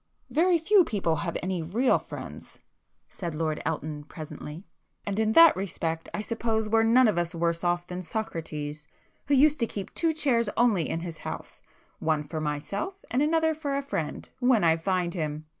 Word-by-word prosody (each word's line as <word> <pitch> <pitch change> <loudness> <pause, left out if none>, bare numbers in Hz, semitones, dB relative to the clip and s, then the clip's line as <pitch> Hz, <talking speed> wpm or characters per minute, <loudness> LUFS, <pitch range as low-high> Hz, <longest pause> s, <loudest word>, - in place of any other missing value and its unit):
"Very 345 +3 +4
few 375 +4 +5
people 190 - 0
have 170 +3 -2
any 185 -1 -1
real 215 +11 +2
friends,"—said 170 -4 -10
Lord 155 -1 -1
Elton 155 -2 -3
presently. 155 +2 -8 0.4
"And 205 +1 -2
in 220 0 +2
that 330 +2 +8
respect 165 -4 -3
I 210 - -3
suppose 220 0 -1
we're 225 +1 +3
none 235 +3 +5
of 205 -5 +2
us 170 0 -2
worse 170 0 0
off 175 0 +1
than 180 0 -5
Socrates, 155 -6 -5 0.4
who 285 - +4
used 295 +2 +5
to 230 - +1
keep 200 -3 -6
two 330 -1 +1
chairs 255 -8 +2
only 220 -9 +3
in 165 - -2
his 170 -2 -6
house - - -7 0.4
'one 155 -1 +1
for 155 +2 -5
myself, 200 - -4
and 250 +3 +2
another 320 +1 +3
for 290 -3 -2
a 280 - -2
friend—when 245 - 0
I 165 -1 +5
find 175 +1 -1
him! 155 -3 -3
190 Hz, 175 wpm, -27 LUFS, 160-255 Hz, 0.4 s, that